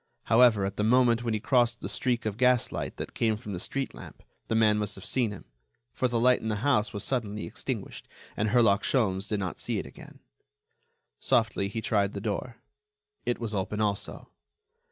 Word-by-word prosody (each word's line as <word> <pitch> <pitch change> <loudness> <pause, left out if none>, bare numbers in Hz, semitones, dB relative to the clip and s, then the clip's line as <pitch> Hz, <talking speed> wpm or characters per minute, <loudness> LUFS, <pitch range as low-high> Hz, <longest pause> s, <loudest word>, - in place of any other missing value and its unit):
However, 115 -4 +5
at 100 +1 -4
the 105 - 0
moment 120 0 +4
when 115 -2 0
he - - -1
crossed 120 0 +2
the - - -4
streak 125 -3 -1
of 105 -2 -1
gaslight 125 0 +1
that - - -6
came 110 -2 +1
from 105 -2 -7
the 90 - -4
street 135 +8 -3
lamp, - - -12 0.2
the 110 - 0
man 105 -1 +4
must 105 -1 -2
have 95 - -10
seen 125 -4 +1
him, 105 - -9 0.5
for 130 - +1
the 120 -1 0
light 125 +1 +4
in 110 - -4
the 110 - 0
house 120 -7 +2
was 100 - -5
suddenly 105 -7 -2
extinguished - - -5 0.3
and 105 +1 0
Herlock 110 -3 +4
Sholmes 100 -6 0
did 105 - 0
not 95 -3 -4
see - - -1
it - - -3
again. - - -13 1.0
Softly, 110 -4 +1
he 110 +3 -4
tried 100 -2 +1
the 100 - -4
door. 110 +3 -3 0.7
It 120 - +1
was 115 -2 -4
open, 105 +1 -2
also. 105 -2 -3
110 Hz, 195 wpm, -28 LUFS, 100-120 Hz, 1.0 s, However